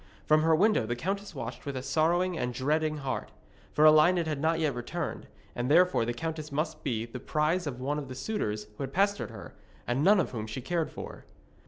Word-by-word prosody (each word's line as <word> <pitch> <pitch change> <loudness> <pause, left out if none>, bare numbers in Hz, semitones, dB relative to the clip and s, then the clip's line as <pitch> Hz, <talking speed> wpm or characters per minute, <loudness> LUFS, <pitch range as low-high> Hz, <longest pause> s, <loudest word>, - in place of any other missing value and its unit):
From 155 0 +4
her 160 0 +4
window 195 - +3
the 120 - -1
countess 195 +8 -3
watched 120 -2 -6
with 140 -2 -4
a 130 - -4
sorrowing 170 +6 +1
and 125 -6 -2
dreading 155 +4 0
heart; 135 -2 -3 0.4
for 150 - +4
Elined 155 +3 +6
had 150 -3 -2
not 160 +1 +2
yet 155 -3 +1
returned, 150 +7 -4 0.3
and 120 +1 -2
therefore 180 -5 +4
the 120 - -1
countess 155 +1 -4
must 155 +2 -2
be 115 -5 -1
the 120 +2 -8
prize 155 +6 0
of 130 -3 -4
one 145 +3 -1
of 140 - -6
these 130 0 -8
suitors 110 - -2
who - - -7
had 135 0 -6
pestered 200 -2 +1
her, 110 -3 -10 0.3
and 125 +4 0
none 200 +3 +6
of 175 - 0
whom 110 -3 -4
she 110 +4 -5
cared 165 +5 -1
for. - - -9
150 Hz, 215 wpm, -29 LUFS, 130-165 Hz, 0.4 s, Elined